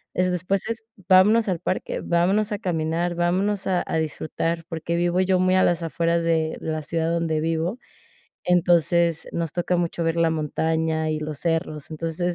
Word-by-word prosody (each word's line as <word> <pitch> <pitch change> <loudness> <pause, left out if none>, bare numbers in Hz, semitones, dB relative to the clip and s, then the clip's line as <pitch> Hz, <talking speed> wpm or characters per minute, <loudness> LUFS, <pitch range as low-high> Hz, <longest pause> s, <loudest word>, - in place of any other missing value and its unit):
Es 180 0 +2
después 180 +2 0
es: 230 0 -4 0.3
"Vámonos 210 +4 +5
al 180 -3 -1
parque, 185 - -3
vámonos 195 +5 +1
a 205 - -2
caminar, 170 0 -1
vámonos 190 +4 0
a 185 -2 +1
a - - -1
disfrutar", 160 +1 -2
porque 165 0 -3
vivo 175 +1 +1
yo 185 0 +2
muy 185 0 +3
a 185 - +4
las 175 -1 +2
afueras 170 +1 0
de 160 -1 +1
la 155 -1 -3
ciudad 165 +2 -1
donde 165 -2 0
vivo. 165 +7 -1 0.6
Entonces 170 -2 +2
nos 165 -2 -2
toca 180 0 0
mucho 170 -1 -1
ver 165 0 0
la 165 -1 +3
montaña 160 +1 -1
y 155 - -1
los 155 -1 -5
cerros, 165 -3 -2
entonces 165 +1 -4
170 Hz, 175 wpm, -24 LUFS, 160-180 Hz, 0.6 s, Vámonos